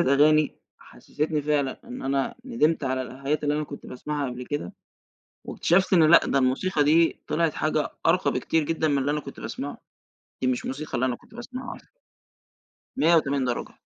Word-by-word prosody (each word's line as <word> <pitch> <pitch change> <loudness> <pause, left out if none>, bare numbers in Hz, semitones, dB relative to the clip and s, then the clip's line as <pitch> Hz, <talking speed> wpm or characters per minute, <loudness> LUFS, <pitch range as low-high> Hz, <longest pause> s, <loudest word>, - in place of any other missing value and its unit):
أغاني، 150 +3 +4 0.3
حسستني 150 0 -3
فعلًا 145 -2 0
إن 125 - -8
أنا 135 0 -1
ندمت 165 - +1
على 130 0 -1
الحاجات 140 +4 -3
اللي 145 - +1
أنا 150 0 -1
كنت 140 - -10
باسمعها 145 +2 -4
قبل 125 0 -7
كده. 145 -12 -4 0.7
واكتشفت 185 +3 +1
إنه 165 -4 +6
لأ، 165 - +6
ده 135 - +2
الموسيقى 145 +5 +1
دي 165 +2 +4
طلعت 165 -1 0
حاجة 155 0 0 0.2
أرقى 175 +3 +3
بكتير 160 -1 0
جدًا 160 0 0
من 140 -1 +2
اللي 140 +2 0
أنا 150 0 0
كنت - - -10
باسمعه، - - -5 0.6
دي 130 - +1
مش 125 -1 -1
موسيقى 145 +4 -5
اللي 130 - +1
أنا 125 - 0
كنت 220 - -19
بأسمعها 250 +1 -7
أصلًا. - - -18 1.1
180 145 -4 +3
درجة. 125 - -3
150 Hz, 175 wpm, -25 LUFS, 135-160 Hz, 1.1 s, إنه